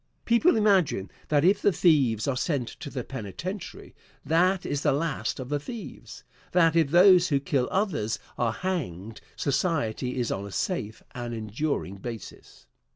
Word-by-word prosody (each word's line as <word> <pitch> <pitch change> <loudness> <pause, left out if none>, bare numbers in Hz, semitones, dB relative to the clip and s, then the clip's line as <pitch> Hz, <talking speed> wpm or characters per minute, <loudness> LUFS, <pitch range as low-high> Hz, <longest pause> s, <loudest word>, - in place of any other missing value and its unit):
People 235 +10 +4
imagine 190 - +2 0.2
that 150 0 +2
if 200 +2 +4
the 205 - +4
thieves 140 - +3
are 140 - +1
sent 130 -2 -1
to - - -9
the 130 -3 -4
penitentiary, 135 - -7 0.3
that 180 +4 +2
is 145 -1 -2
the - - +3
last 140 -7 -2
of 130 -1 -6
the 145 0 0
thieves; 225 - -9 0.3
that 165 -2 +4
if 160 -4 +3
those 180 +2 +6
who 140 -5 +2
kill 135 -2 0
others 170 - -1 0.2
are 120 -2 0
hanged, 115 - -4
society 130 -5 -1
is 120 - -1
on 100 +1 -3
a - - -10
safe 110 - -3
and 120 -2 -5
enduring 110 -1 -3
basis. 115 - -9
145 Hz, 155 wpm, -27 LUFS, 115-180 Hz, 0.3 s, those